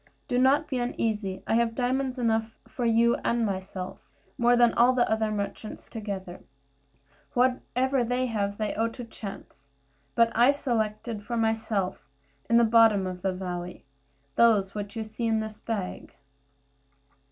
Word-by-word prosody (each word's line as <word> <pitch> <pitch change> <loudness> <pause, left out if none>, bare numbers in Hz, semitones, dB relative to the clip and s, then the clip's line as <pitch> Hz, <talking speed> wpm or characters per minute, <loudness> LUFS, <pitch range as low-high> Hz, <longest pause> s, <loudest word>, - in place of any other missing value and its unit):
Do 245 - +1
not 275 +4 +4
be 260 - -2
uneasy; 215 -5 -2
I - - 0
have 230 0 +2
diamonds 260 +1 0
enough 225 -2 0
for 245 - -4
you 235 +1 +4
and 235 -1 0
myself, 190 -2 -5 0.3
more 240 0 +4
than 240 -1 +5
all 245 +2 +5
the 245 -1 +2
other 220 0 +1
merchants 210 +1 -5
together. 195 -5 -6 1.0
Whatever 255 +1 +1
they 245 +2 0
have 205 -4 -2
they 215 -1 -1
owe 225 +2 +1
to 245 +2 -7
chance; 195 - -9 0.5
but 230 0 +4
I 245 +5 +6
selected 220 -4 -2
for 235 +3 -4
myself, 220 -6 -1 0.4
in 235 - +5
the 235 - +6
bottom 225 -3 +5
of 180 -1 -5
the 190 0 0
valley, 180 -2 -6 0.5
those 210 -5 +4
which 205 0 -5
you 225 - -2
see 220 +2 -4
in 220 -1 +2
this 220 -1 -5
bag." 205 -5 -5
225 Hz, 155 wpm, -27 LUFS, 205-240 Hz, 1.0 s, I